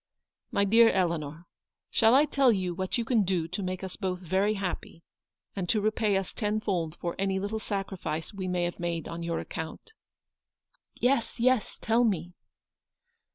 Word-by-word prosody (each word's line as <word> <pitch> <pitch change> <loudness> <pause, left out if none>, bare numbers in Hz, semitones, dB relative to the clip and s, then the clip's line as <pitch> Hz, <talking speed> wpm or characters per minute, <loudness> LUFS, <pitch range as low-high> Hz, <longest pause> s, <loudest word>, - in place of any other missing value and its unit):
" - - -64
My 200 - +2
dear 225 +3 +7
Eleanor, 165 -3 -1 0.5
shall 225 +2 +5
I 285 +3 +6
tell 275 -4 +4
you 185 -4 0
what 185 +5 -2
you 235 - -1
can 230 -2 +3
do 180 -3 0
to 180 +4 -3
make 185 0 -3
us 190 - -5
both 185 -3 -2
very 190 +4 +1
happy, 180 -3 -5 0.5
and 185 -3 -3
to 220 - +3
repay 210 -1 +2
us 195 -1 -3
tenfold 205 -7 -1
for 170 -1 -4
any 195 0 +1
little 205 +3 -2
sacrifice 190 -7 -4
we 190 -2 -4
may 180 -1 0
have 175 0 -3
made 170 -2 -2
on 170 0 -5
your 170 0 -2
account? 160 - -7 0.4
" - - -64
" - - -42
Yes, 245 -2 +1
yes; 250 -2 +2
tell 230 +2 +3
me." 180 -6 0
190 Hz, 180 wpm, -29 LUFS, 175-215 Hz, 0.5 s, dear